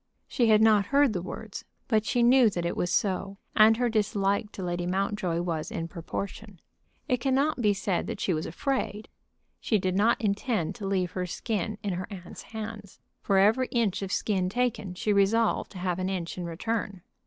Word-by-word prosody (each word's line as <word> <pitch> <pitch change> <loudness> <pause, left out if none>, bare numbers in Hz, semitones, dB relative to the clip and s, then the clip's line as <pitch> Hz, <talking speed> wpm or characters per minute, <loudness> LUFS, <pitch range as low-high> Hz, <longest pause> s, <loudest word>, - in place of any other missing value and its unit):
She 240 -4 +1
had 215 0 +6
not 210 -2 +5
heard 280 -4 +3
the 180 - -2
words, 195 +3 -7 0.2
but 215 -2 +1
she 240 +3 +2
knew 245 -1 +6
that 175 -4 -3
it 170 - -1
was 175 - -1
so, 195 +1 0 0.2
and 220 +1 +6
her 245 0 +1
dislike 205 -1 0
to 190 - -6
Lady 175 0 -2
Mountjoy 185 -2 -1
was 165 -3 -3
in 165 -1 -4
proportion. 195 +3 -6 0.5
It 250 -4 +2
cannot 270 +2 +1
be 205 -3 +3
said 195 -2 -1
that - - -5
she 185 - 0
was 155 0 -2
afraid. 220 - -2 0.5
She 220 - +1
did 185 -1 -1
not 215 +4 +3
intend 205 -3 -1
to 205 -4 -6
leave 185 -3 0
her 180 -1 -3
skin 215 +2 -3
in 200 -2 -1
her 180 +1 -4
aunt's 185 -3 -9
hands. 215 -3 -8 0.2
For 195 - +2
every 220 +6 +4
inch 225 -6 0
of 195 -1 -4
skin 190 -3 0
taken 215 -4 -1
she 210 +3 0
resolved 210 +3 +2
to - - -9
have 180 0 -2
an 185 0 -1
inch 180 -3 -3
in 180 - -5
return. 195 +2 -3
200 Hz, 195 wpm, -28 LUFS, 180-220 Hz, 0.5 s, had